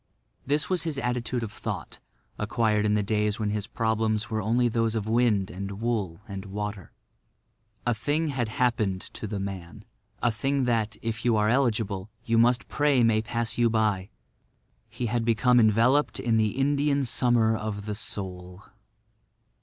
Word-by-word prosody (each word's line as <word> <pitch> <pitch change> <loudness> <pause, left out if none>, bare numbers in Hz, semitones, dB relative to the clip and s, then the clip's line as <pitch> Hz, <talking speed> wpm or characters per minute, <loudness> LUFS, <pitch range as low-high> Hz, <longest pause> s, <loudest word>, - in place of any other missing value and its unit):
This 145 +2 +1
was 185 -2 0
his 160 -4 -3
attitude 125 -1 -1
of 110 - -5
thought, 110 - -6 0.4
acquired 105 -1 +1
in 105 - +2
the 105 - +1
days 105 +1 0
when 105 -2 -1
his 105 -1 -2
problems 110 +1 0
were 110 -1 0
only 120 +4 +2
those 115 -1 0
of 110 -2 -1
wind 110 -4 +2
and 100 +2 -6
wool 105 -7 -2
and 100 -1 -6
water. 100 -1 -5 0.9
A 120 - +2
thing 150 +8 0
had 125 -5 -1
happened 110 -6 0
to 110 - -5
the 100 0 -3
man—a 95 +4 -5
thing 135 +5 0
that, 110 -3 0
if 115 0 -3
you 120 -2 +3
are 105 0 +2
eligible, 110 -6 0 0.2
you 115 -1 +2
must 120 +1 +3
pray 145 -4 +2
may 110 -1 +3
pass 115 +1 -2
you 120 -1 +4
by. 105 -4 0 0.8
He 120 +2 -4
had 120 +1 0
become 120 +2 +4
enveloped 115 +7 +3
in 120 -4 +1
the 110 +1 +1
Indian 140 0 +2
Summer 120 -2 +2
of 105 -2 -4
the 105 - -3
Soul. 95 -2 -5
110 Hz, 160 wpm, -27 LUFS, 105-120 Hz, 0.9 s, you